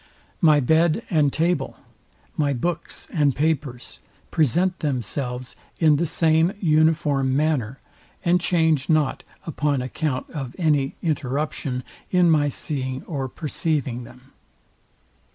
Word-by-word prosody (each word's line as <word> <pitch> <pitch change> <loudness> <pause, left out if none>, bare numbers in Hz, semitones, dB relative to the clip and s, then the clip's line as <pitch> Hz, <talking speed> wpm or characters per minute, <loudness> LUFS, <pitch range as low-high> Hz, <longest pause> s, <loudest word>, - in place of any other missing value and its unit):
My 155 -4 +6
bed 160 - +2
and 150 -4 +3
table, 165 -3 0 0.6
my 145 -2 +1
books 165 +6 -3
and 145 -4 +2
papers, 145 -5 -2 0.3
present 175 +5 +2
themselves 125 -2 -3 0.2
in 155 -3 +4
the 170 +3 0
same 160 +3 +3
uniform 155 -5 +2
manner, 140 -5 0 0.5
and 175 +1 +3
change 160 -5 +2
not 155 -4 +2 0.2
upon 150 -3 0
account 130 +1 -2
of 135 -5 -6
any 150 -5 +1
interruption 140 -3 -2 0.3
in 180 -2 +4
my 145 -2 +3
seeing 130 -2 -3
or 135 -5 -4
perceivilng 145 -5 -2
them. 130 +3 -16
150 Hz, 115 wpm, -23 LUFS, 135-160 Hz, 0.6 s, My